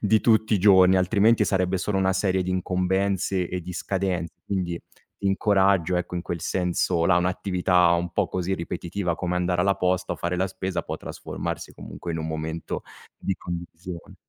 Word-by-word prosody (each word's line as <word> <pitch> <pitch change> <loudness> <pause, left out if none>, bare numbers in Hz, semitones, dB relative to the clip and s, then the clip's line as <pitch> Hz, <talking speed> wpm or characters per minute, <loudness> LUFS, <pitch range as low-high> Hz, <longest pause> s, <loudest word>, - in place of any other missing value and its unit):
di 110 +1 +3
tutti 110 -1 +3
i - - +2
giorni. 95 -1 +6
Altrimenti, 105 +5 +4
sarebbe 95 -1 +1
solo 95 +2 -1
una 95 0 +2
serie 95 -1 +1
di 95 - -3
incombenze 95 0 0
e 90 +1 -4
di 90 +2 -7
scadenze. 95 -3 -2
Quindi, 90 -3 -2 0.4
ti 100 - -3
incoraggio, 95 -3 +3
ecco, 90 0 -3
in 90 - -2
quel 85 -1 -4
senso 90 -1 0
là: 90 +1 +4
un'attività 90 -1 +2
un 85 0 0
po' - - +1
così 95 +1 -2
ripetitiva, 85 +1 -3
come 90 +1 -2
andare 90 0 +1
alla 100 +1 +3
posta 90 0 0
o - - -11
fare 90 +1 -2
la 95 - +1
spesa, 95 0 -3
può - - -5
trasformarsi, - - -6
comunque, 85 - -7
in 80 - -3
un 80 - -3
momento 80 +1 -4 0.4
di 95 - -1
condivisione. 85 0 -7
90 Hz, 180 wpm, -25 LUFS, 90-95 Hz, 0.4 s, giorni